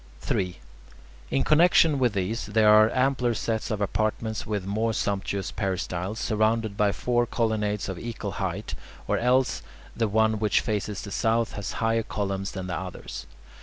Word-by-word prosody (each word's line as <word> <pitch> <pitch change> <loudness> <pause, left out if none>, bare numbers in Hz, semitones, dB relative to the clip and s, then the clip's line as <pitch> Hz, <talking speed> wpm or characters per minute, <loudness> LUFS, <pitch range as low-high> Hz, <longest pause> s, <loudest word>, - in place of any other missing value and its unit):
3. 90 -2 -1 0.7
In 70 -1 +1
connexion 160 -2 +5
with 125 -4 +2
these 100 +4 -2
there 105 0 +5
are 110 +1 +7
ampler 130 -2 +1
sets 110 0 -2
of 105 -2 -2
apartments 110 +2 -1
with 105 -3 -2
more 110 +3 0
sumptuous 100 -2 -2
peristyles, 95 +1 -2
surrounded 110 -1 +1
by 105 0 +2
four 120 +2 0
colonnades 105 -3 -1
of 95 -2 -5
equal 115 -3 -5
height, 95 +3 -3 0.3
or - - +1
else 125 0 +2 0.3
the 115 -1 +1
one 110 +1 +2
which 105 -2 +3
faces 105 -1 -3
the 100 - -7
south 115 +2 +1
has 105 - -4
higher 115 0 +1
columns 100 -3 -3
than 95 -2 -5
the 90 - -3
others. 95 -1 -7
110 Hz, 160 wpm, -26 LUFS, 100-115 Hz, 0.7 s, are